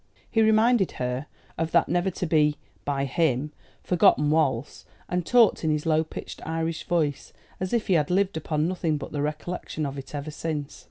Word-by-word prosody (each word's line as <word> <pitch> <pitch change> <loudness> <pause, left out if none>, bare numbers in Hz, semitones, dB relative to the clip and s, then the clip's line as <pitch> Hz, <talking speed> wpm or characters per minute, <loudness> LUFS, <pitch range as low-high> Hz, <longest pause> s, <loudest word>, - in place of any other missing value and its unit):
He 225 - +3
reminded 220 -1 +4
her 125 +3 -3 0.3
of 165 0 0
that 170 - +4
never 175 +2 +1
to 185 - -4
be, 150 -2 +3 0.3
by 140 -1 0
him, 150 -2 0 0.3
forgotten 175 -5 +4
waltz, 145 -5 0 0.2
and 180 0 -1
talked, 235 +1 +4
in 160 - +1
his 150 -1 0
low 160 -1 +3
pitched 155 - -8
Irish 165 0 -3
voice, 155 -5 -1 0.3
as 185 0 -3
if 235 -2 +1
he 190 - +2
had 150 -4 +2
lived 195 +1 +1
upon 155 0 -1
nothing 170 -4 -1
but 140 - -7
the 145 - -2
recollection 155 +1 -3
of 140 0 -4
it 135 +2 -9
ever 145 +2 -4
since. 150 -1 -4
160 Hz, 185 wpm, -26 LUFS, 145-180 Hz, 0.3 s, reminded